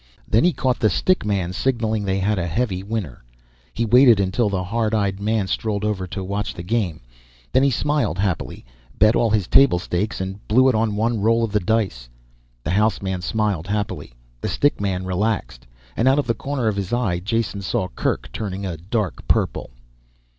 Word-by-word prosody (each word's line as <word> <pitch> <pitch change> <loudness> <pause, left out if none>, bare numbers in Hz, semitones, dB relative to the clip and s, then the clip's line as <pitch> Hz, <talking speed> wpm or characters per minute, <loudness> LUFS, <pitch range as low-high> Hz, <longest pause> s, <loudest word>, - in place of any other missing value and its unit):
Then 110 - +3
he 180 - +4
caught 130 -5 -1
the 110 - +3
stick 185 - +1
man 95 -4 -1
signaling 110 -2 0
they 95 0 0
had 100 +1 0
a 85 - -2
heavy 95 0 -1
winner. 100 - -5 0.5
He 115 - -1
waited 120 -1 +6
until 100 +3 +1
the 95 -2 -1
hard 110 +3 -1
eyed 100 -2 0
man 105 0 0
strolled 105 +1 -2
over 95 -3 -2
to 95 +2 -5
watch 100 +2 -3
the 85 - -6
game, 95 -5 -1 0.5
then 130 - +4
he 140 - +4
smiled 145 - 0
happily, 95 -9 -2 0.3
bet 110 +2 +5
all 115 - +2
his 105 -3 +1
table 135 -10 +5
stakes 90 +4 -2
and 95 +1 -4
blew 130 +5 +5
it - - +2
on 110 -1 +1
one 115 0 0
roll 115 +2 +3
of 115 - -1
the 105 - +2
dice. 95 - -1 0.5
The 80 - -2
house 105 +4 +2
man 95 -2 -3
smiled 100 -3 -1
happily, 100 -10 -3 0.3
the - - -2
stick 145 -6 +1
man 95 -2 -1
relaxed 95 - -2 0.3
and 115 - +1
out 135 +1 +5
of 145 - +1
the 115 - +1
corner 130 +1 -3
of 105 -2 0
his 95 -2 -3
eye 115 -8 0
Jason 105 +1 -2
saw 95 -1 -1
Kerk - - -2
turning 100 -2 -4
a 90 -4 -4
dark 100 +3 -3
purple. - - 0
105 Hz, 195 wpm, -22 LUFS, 95-115 Hz, 0.5 s, waited